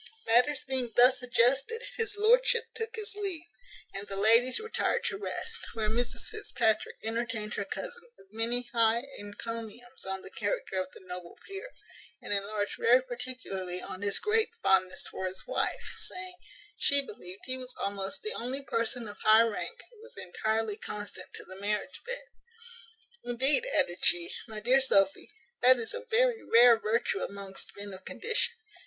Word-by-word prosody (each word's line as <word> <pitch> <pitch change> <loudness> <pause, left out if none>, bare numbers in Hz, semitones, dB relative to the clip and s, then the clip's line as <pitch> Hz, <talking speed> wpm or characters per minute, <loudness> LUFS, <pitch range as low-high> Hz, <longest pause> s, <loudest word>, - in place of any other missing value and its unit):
Matters 250 +5 +3
being 260 -3 -1
thus 250 +1 +6
adjusted, 265 - +2
his 445 -2 -2
lordship 470 +2 +4
took 455 0 -4
his 430 -1 -4
leave, 390 -6 -1 0.5
and 200 +1 -6
the 195 - -4
ladies 230 +5 +6
retired 445 +1 -1
to - - -1
rest, 455 +2 -3 0.2
where 215 -2 0
Mrs 240 +2 -1
Fitzpatrick 235 - 0
entertained 225 -1 -2
her 200 - -2
cousin 475 - -6
with 195 +2 -21
many 235 +2 0
high 230 0 +3 0.2
encomiums 230 +4 -7
on 190 0 -4
the - - -9
character 205 -2 -2
of 185 0 -7
the - - -13
noble 180 -2 -9
peer, 395 +5 -7 0.5
and - - -3
enlarged 205 +1 -2
very 250 +2 +5
particularly 240 -8 -4
on 185 - -6
his 200 -1 +4
great 440 +1 +2
fondness 185 -1 +2
for 190 - -4
his 185 0 -6
wife; - - -2
saying, 365 0 -3 0.4
she 280 -1 +3
believed 190 -5 -11
he 260 0 -3
was 255 0 -7
almost 200 +5 -3
the 430 - -2
only 260 +4 -3
person 230 -1 -1
of 205 0 -9
high 220 +1 +7
rank 230 - -3
who 450 -3 -18
was 475 +2 -14
entirely 220 +3 -1
constant 205 -2 -7
to - - -5
the 190 +1 -10
marriage 210 +1 -2
bed. - - -4 1.0
"Indeed," 265 - +4
added 185 - +1
she, 175 -1 +3 0.2
"my 220 -2 -6
dear 250 +5 +4
Sophy, 195 -5 +3 0.3
that 255 +1 +7
is 230 - -4
a 485 +1 -6
very 475 0 +3
rare 235 0 +7
virtue 215 -2 0
amongst 200 0 -4
men 200 -1 -7
of 190 0 -10
condition. 460 - 0
235 Hz, 165 wpm, -30 LUFS, 205-295 Hz, 1.0 s, high